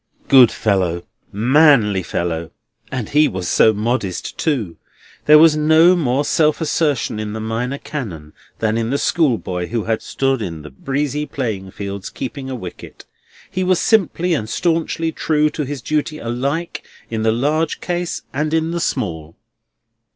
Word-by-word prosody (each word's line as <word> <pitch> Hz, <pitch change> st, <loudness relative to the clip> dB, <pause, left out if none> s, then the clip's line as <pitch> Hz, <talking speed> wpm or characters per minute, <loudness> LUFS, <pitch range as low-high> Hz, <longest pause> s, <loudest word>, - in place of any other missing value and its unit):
Good 130 Hz, -4 st, +8 dB
fellow! 90 Hz, -5 st, 0 dB, 0.3 s
manly 120 Hz, -3 st, +4 dB
fellow! 85 Hz, -2 st, -3 dB, 0.4 s
And 125 Hz, -5 st, -4 dB
he 150 Hz, +1 st, +4 dB
was 95 Hz, -1 st, -4 dB
so 110 Hz, -, +5 dB
modest, 105 Hz, -3 st, -2 dB
too. 120 Hz, -, -2 dB, 0.5 s
There 150 Hz, +1 st, +8 dB
was 155 Hz, 0 st, +6 dB
no 160 Hz, +4 st, +5 dB
more 140 Hz, -4 st, 0 dB
self 155 Hz, -1 st, +2 dB
assertion 150 Hz, -8 st, 0 dB
in 105 Hz, -1 st, -4 dB
the 110 Hz, -, -4 dB
Minor 115 Hz, +5 st, -2 dB
Canon 90 Hz, -, -7 dB, 0.2 s
than 110 Hz, 0 st, 0 dB
in 115 Hz, 0 st, -1 dB
the 140 Hz, -, +1 dB
schoolboy 110 Hz, -, 0 dB
who 115 Hz, -2 st, -2 dB
had 110 Hz, -1 st, -1 dB
stood 135 Hz, -2 st, -1 dB
in 85 Hz, -6 st, -5 dB
the 75 Hz, -, -10 dB
breezy 145 Hz, -, -2 dB
playing 105 Hz, -8 st, -4 dB
fields 100 Hz, 0 st, -6 dB
keeping 135 Hz, +1 st, -6 dB
a 130 Hz, -, -3 dB
wicket. 95 Hz, -7 st, -10 dB, 0.5 s
He 185 Hz, -, -1 dB
was 185 Hz, -1 st, +2 dB
simply 180 Hz, -5 st, +2 dB
and 110 Hz, -8 st, -2 dB
staunchly 165 Hz, +1 st, 0 dB
true 150 Hz, -1 st, +1 dB
to 150 Hz, -, -3 dB
his 140 Hz, -2 st, -6 dB
duty 155 Hz, 0 st, -1 dB
alike 140 Hz, +7 st, -3 dB, 0.3 s
in 110 Hz, -1 st, -2 dB
the 110 Hz, 0 st, +2 dB
large 150 Hz, +7 st, 0 dB
case 175 Hz, -1 st, -3 dB
and 150 Hz, +3 st, 0 dB
in 160 Hz, 0 st, 0 dB
the 170 Hz, -, -2 dB
small. 85 Hz, -, -3 dB
130 Hz, 160 wpm, -19 LUFS, 105-155 Hz, 0.5 s, Good